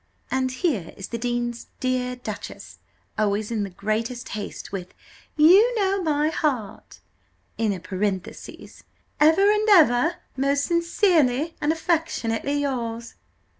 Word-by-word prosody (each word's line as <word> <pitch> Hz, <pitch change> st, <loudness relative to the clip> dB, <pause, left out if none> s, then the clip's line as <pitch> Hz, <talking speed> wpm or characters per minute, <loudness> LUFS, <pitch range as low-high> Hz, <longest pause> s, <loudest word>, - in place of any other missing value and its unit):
"And 260 Hz, 0 st, +1 dB
here 255 Hz, -, -2 dB
is 195 Hz, -, -7 dB
the 230 Hz, -, -4 dB
dean's 240 Hz, 0 st, -3 dB
dear 255 Hz, -1 st, -1 dB
duchess, 215 Hz, -5 st, -8 dB, 0.4 s
always 210 Hz, +1 st, 0 dB
in 225 Hz, -2 st, -1 dB
the 200 Hz, -, -3 dB
greatest 220 Hz, +6 st, -3 dB
haste, 205 Hz, -1 st, -6 dB
with 185 Hz, -2 st, -6 dB, 0.4 s
'You 390 Hz, +11 st, +6 dB
know 395 Hz, -2 st, +1 dB
my 305 Hz, -2 st, +1 dB
heart,' 265 Hz, -10 st, -3 dB, 0.6 s
in 220 Hz, -2 st, +1 dB
a 190 Hz, -, -3 dB
parenthesis, 190 Hz, 0 st, -5 dB, 0.4 s
'ever 325 Hz, +7 st, +5 dB
and 425 Hz, +1 st, +1 dB
ever 325 Hz, -, +5 dB, 0.2 s
most 280 Hz, +1 st, +1 dB
sincerely 335 Hz, -, +2 dB
and 295 Hz, -, +2 dB
affec' 325 Hz, 0 st, 0 dB, 0.4 s
yours. 245 Hz, -5 st, -2 dB
255 Hz, 125 wpm, -24 LUFS, 220-325 Hz, 0.6 s, You